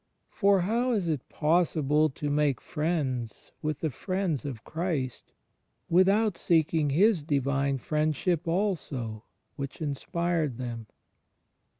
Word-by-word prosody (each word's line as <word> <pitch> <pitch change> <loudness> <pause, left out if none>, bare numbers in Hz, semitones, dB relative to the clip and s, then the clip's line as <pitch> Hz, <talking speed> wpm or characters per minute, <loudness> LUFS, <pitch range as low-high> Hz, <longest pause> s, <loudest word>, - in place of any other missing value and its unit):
For 200 -2 +3
how 235 +7 +1
is 200 -6 0
it 155 -6 -2
possible 155 -2 +2
to 145 +1 -4
make 145 -3 +2
friends 145 -8 -2
with 155 -2 -2
the 160 - 0
friends 185 - -2
of 125 -7 -5
Christ, 155 -7 -3 0.6
without 195 +3 +4
seeking 160 -2 +2
His 180 +3 +4
Divine 140 -1 +1
Friendship 155 +5 0
also 155 - -2 0.3
which 140 -1 -5
inspired 155 -1 -1
them? 120 -3 -5
155 Hz, 110 wpm, -28 LUFS, 140-175 Hz, 0.6 s, without